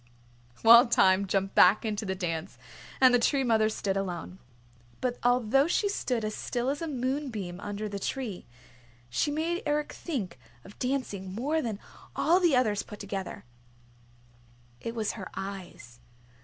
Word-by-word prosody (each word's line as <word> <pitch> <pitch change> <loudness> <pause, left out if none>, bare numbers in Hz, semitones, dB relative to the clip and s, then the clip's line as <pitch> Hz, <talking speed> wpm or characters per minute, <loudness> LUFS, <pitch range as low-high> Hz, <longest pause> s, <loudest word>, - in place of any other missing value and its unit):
Wild 235 +2 +8
Thyme 190 -1 +4
jumped 195 0 0
back 195 +5 +5
into 210 -1 -2
the 190 - -1
dance 175 -1 -4 0.4
and 255 -1 +6
the 245 - +5
Tree 270 +3 +2
Mother 220 -3 +3
stood 200 -3 -2
alone. 185 -1 -4 0.6
But 245 -1 -2
although 245 +3 +3
she 405 +4 +1
stood 250 - -1
as 215 - -3
still 245 +4 -2
as 290 - -5
a 330 - -2
moonbeam 255 - -3
under 205 +1 -4
the 200 -1 -5
tree, 220 -3 -4 0.6
she 205 - +1
made 325 +4 -1
Eric 295 0 -1
think 205 - -5 0.2
of 200 - -15
dancing 210 -8 -3
more 295 +8 0
than 225 -6 -3 0.4
all 345 +3 +3
the 345 -7 +3
others 215 -5 +2
put 210 -2 -11
together. 195 -6 -6 1.3
It 230 0 -5
was 220 -2 -1
her 190 -5 -8
eyes. 180 -11 -8
220 Hz, 155 wpm, -28 LUFS, 195-265 Hz, 1.3 s, Wild